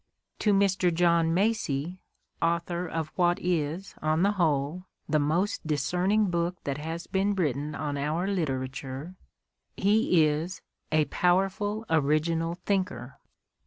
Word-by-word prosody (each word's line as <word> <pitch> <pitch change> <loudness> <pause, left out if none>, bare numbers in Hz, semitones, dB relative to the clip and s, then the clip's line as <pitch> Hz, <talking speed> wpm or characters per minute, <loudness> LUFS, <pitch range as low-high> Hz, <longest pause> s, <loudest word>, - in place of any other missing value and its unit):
To 210 - +2
Mr. 195 -2 +3
John 170 -1 +3
Macy, 180 -4 0 0.4
author 170 +1 0
of 160 -1 -3
what 175 +1 +2
is, 175 +2 -2
on 155 +2 +1
the 200 - +4
whole, 165 -2 0 0.2
the 155 - +2
most 165 +6 0
discerning 180 +7 +1
book 170 +1 0
that 140 0 -3
has 165 +2 -5
been 200 +1 0
written 150 -4 -1
on 145 -1 -3
our 155 +5 -1
literature, 135 -3 -3 0.6
he 200 -5 +4
is 160 +4 -2
" - - -46
a 155 -1 +3
powerful, 195 +6 +1
original 160 +2 +1
thinker. 185 -10 -2
170 Hz, 125 wpm, -28 LUFS, 150-185 Hz, 0.6 s, the